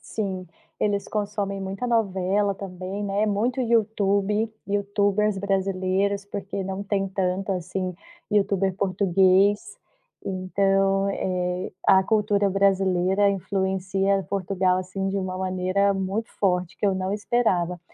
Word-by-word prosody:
Sim, 190 -4 -4 0.3
eles 200 -1 0
consomem 205 -2 -2
muita 195 +5 -4
novela 200 -3 +1
também, 190 +1 -6
né, 200 +2 0
muito 230 +6 0
YouTube, 215 -2 +1 0.2
youtubers 205 +1 +1
brasileiros, 195 0 0
porque 200 -1 -5
não 190 +1 -4
tem 195 -1 -1
tanto, 190 +1 -1
assim, 185 0 -3 0.4
youtuber 195 -2 +2
português, 195 - +2 0.5
então, 195 +1 +1
eh, 180 -1 -2 0.2
a 190 -1 +6
cultura 205 -1 +2
brasileira 195 0 +2
influencia 195 0 0
Portugal, 185 -1 +1
assim, 190 +1 -3
de 195 - -2
uma 185 -1 -3
maneira 185 +2 +1
muito 195 +4 -2
forte, 180 -3 0
que - - 0
eu 195 - +2
não 190 +1 -2
esperava. 195 -5 0
195 Hz, 115 wpm, -25 LUFS, 185-200 Hz, 0.5 s, a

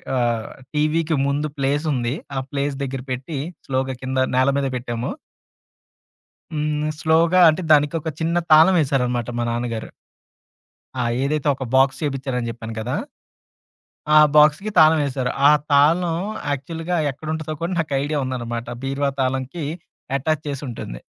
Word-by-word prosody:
ఆహ్, 120 -3 0 0.3
టీవీకి 155 +2 +1
ముందు 145 +2 0
ప్లేసుంది. 135 -3 0 0.2
ఆ - - +2
ప్లేస్ 140 0 -1
దగ్గర 135 -1 -4
పెట్టి. 135 +3 -4 0.3
స్లోగా 130 0 -1
కింద 130 0 -3 0.2
నేల 130 +1 +4
మీద 140 -1 0
పెట్టాము. 120 0 -4 1.4
హ్మ్. 150 0 -1
స్లోగా 165 +3 +3
అంటే, 155 +4 0
దానికి 150 +1 +4
ఒక 160 - -3
చిన్న 170 +2 +1
తాళం 160 +5 +7
వేశారనమాట. 125 -5 0
మా - - 0
నాన్నగారు. 115 -1 -3 1.1
ఆ! - - +1 0.2
ఏదైతే 150 +1 -1
ఒక 130 - -6
బాక్స్ 135 +1 +4
చేపించారని 135 -4 -2
చెప్పాను 115 -1 -8
కదా! 120 +3 -2 1.2
ఆ - - +9 0.2
బాక్స్‌కి 150 +7 +5
తాళం 155 0 +6
వేశారు. 130 -2 -2 0.2
ఆ - - +7 0.2
తాళం 165 +4 +4 0.3
యాక్చువల్‌గా 165 +5 -3 0.2
ఎక్కడుంటాదో 155 +2 -5
కూడా 170 +2 -2
నాకు 155 -3 -2
ఐడియా 150 +1 -1
ఉందనమాట. 120 -2 -4 0.2
బీర్వా 135 +1 0
తాళంకి 130 +5 -2 0.5
అటాచ్ 155 +3 -1
చేసింటుంది. 130 - -6
140 Hz, 130 wpm, -21 LUFS, 130-155 Hz, 1.4 s, ఆ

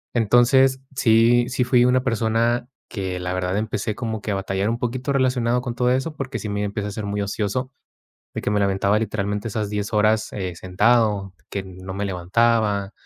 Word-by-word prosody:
Entonces 125 +4 +4 0.2
sí, 120 0 +4
sí, 125 0 0
fui 125 -1 +4
una 125 0 +3
persona 115 0 0 0.2
que 95 -3 -4
la 90 0 -3
verdad 90 +1 -1
empecé 110 0 -2
como 110 -3 -4
que 110 - -6
a 100 - 0
batallar 95 +1 -1
un 115 - -1
poquito 125 +3 -2
relacionado 125 -3 +1
con 125 -1 -4
todo 125 0 +1
eso 135 +5 0
porque 135 -2 -4
sí 105 - -5
me 100 0 -2
empieza 105 0 -3
a - - -6
ser 105 0 -5
muy 100 0 -2
ocioso 105 +6 -2 0.6
de - - -3
que - - -1
me 105 - +1
lamentaba 100 +1 +2
literalmente 105 -1 -2
esas 105 -1 -3
10 105 +1 -3
horas, 105 +1 +2
eh, 90 -4 -4
sentado, 105 +1 +1 0.2
que 100 - -3
no 95 0 -9
me 100 +1 -2
levantaba, 100 +2 +1
110 Hz, 195 wpm, -22 LUFS, 100-120 Hz, 0.6 s, Entonces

